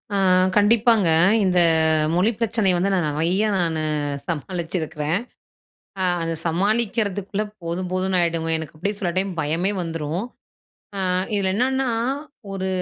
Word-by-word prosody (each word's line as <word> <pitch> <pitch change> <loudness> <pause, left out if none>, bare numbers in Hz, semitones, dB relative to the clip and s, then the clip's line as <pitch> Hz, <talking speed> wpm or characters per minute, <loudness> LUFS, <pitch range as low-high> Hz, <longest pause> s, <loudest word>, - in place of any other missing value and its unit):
ஆ - - +2 0.4
கண்டிப்பாங்க. 220 -2 +4 0.4
இந்த 180 -2 +2 0.6
மொழி 185 +5 +3
பிரச்சனை 225 -3 +1
வந்து 180 +3 +1
நான் 175 -5 +1
நெறைய 170 +8 +1
நானு 165 -3 0 0.5
சமாளிச்சிருக்கிறேன். 165 0 -2 0.8
அ - - +1 0.2
அத 165 0 -2
சமாளிக்கிறதுக்குள்ள 205 +2 0 0.2
போதும் 175 +2 -3
போதும்ன்னு 185 0 0
ஆயிடுங்க. 165 -1 0
எனக்கு 160 -2 -8
அப்படியே 200 +7 -3
சில 180 - -1
டைம் 195 +1 0
பயமே 165 +6 0
வந்துரும். 165 +1 -3 0.7
அ - - -3 0.4
இதுல 195 -2 +1
என்னான்னா, 265 +4 +1 0.6
ஒரு 190 -1 -3
185 Hz, 120 wpm, -22 LUFS, 165-205 Hz, 0.8 s, கண்டிப்பாங்க